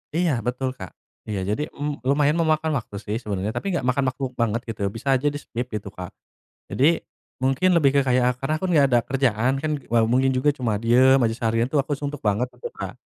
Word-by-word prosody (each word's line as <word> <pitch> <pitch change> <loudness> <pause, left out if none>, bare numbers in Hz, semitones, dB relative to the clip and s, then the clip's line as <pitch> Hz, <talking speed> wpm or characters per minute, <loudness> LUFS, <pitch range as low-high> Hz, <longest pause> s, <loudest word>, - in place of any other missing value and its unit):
Iya, 175 -1 +2
betul 125 +2 -1
Kak. 95 - -9 0.3
Iya, 105 -2 -4
jadi, 150 +8 -2
m 145 0 -3
lumayan 145 +3 +2
memakan 160 -2 +1
waktu 115 -5 -5
sih, 105 - -4
sebenarnya. 105 -1 -3
Tapi - - -3
nggak 165 -8 -1
makan 140 +2 +1
waktu 130 +2 -8
banget, 115 -1 0
gitu 115 -2 -6
ya. 100 - +1
Bisa 115 +6 -9
aja 135 +3 0
di-skip, 125 -4 -5
gitu 105 -2 -5
Kak. 90 -3 -8 0.6
Jadi, 160 +6 +4 0.4
mungkin 135 +8 +2
lebih 140 -4 +4
ke - - +4
kayak 125 0 +2
karena 135 +3 -1
akun 185 +3 -3
nggak 145 -3 +5
ada 120 -2 +4
kerjaan, 130 0 +1
kan. 155 - -1
Wal 115 -1 +2
mungkin 130 +2 +3
juga 130 +3 +2
cuma 120 -7 -1
diem 130 +3 +5
aja 115 -1 +1
seharian, 115 +1 0
tuh, 150 - 0
aku 140 +1 0
suntuk 145 +1 -5
banget, 105 +4 +1
itu 475 - -6
Kak. - - -7
130 Hz, 215 wpm, -23 LUFS, 115-145 Hz, 0.6 s, nggak